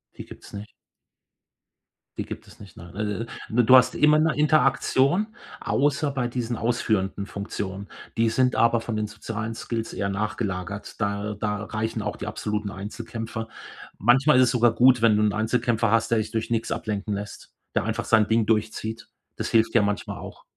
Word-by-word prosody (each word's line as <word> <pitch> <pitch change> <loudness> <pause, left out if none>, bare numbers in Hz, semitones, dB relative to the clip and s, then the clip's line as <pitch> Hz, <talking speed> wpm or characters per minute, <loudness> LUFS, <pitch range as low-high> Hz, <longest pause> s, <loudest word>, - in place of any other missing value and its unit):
Die - - -9
gibt's - - -13
nicht. 105 +2 -8 1.5
Die - - -3
gibt - - -8
es - - -17
nicht, 100 -4 -13
nein. 85 +2 -12 0.5
Äh, 120 +2 +3
du 130 +3 +7
hast 125 -1 +6
immer 150 0 +5
'ne 160 0 +3
Interaktion, 150 +3 +3 0.3
außer 145 +1 +1
bei 130 -3 -1
diesen 120 -1 -3
ausführenden 105 -4 0
Funktionen. 100 -1 -5 0.3
Die 115 0 +3
sind 125 +2 +2
aber 115 0 +3
von 115 -1 -4
den 105 - -1
sozialen 110 +1 -5
Skills 115 0 -4
eher 100 0 -2
nachgelagert. 100 -1 -4
Da 100 0 -2
da 105 -1 -2
reichen 110 +1 -3
auch 105 0 -3
die - - -6
absoluten 105 -1 -3
Einzelkämpfer. 110 +3 -6 0.5
Manchmal 130 +6 +5
ist 130 - +7
es 120 - +1
sogar 120 -2 +4
gut, 125 -1 +5
wenn 110 -2 +5
du 105 - +2
'n 105 - +2
Einzelkämpfer 115 0 +1
hast, 115 0 +2
der 115 - +2
sich 110 0 -2
durch 110 -1 -2
nix 115 -1 -1
ablenken 105 -1 -3
lässt, 105 +1 -7 0.2
der - - +2
einfach - - -2
sein 110 -2 +4
Ding 110 0 +2
durchzieht. 110 0 -1 0.3
Das - - -3
hilft 115 +1 +2
ja 115 - +6
manchmal 100 0 -2
auch. - - -10
110 Hz, 180 wpm, -25 LUFS, 105-120 Hz, 1.5 s, du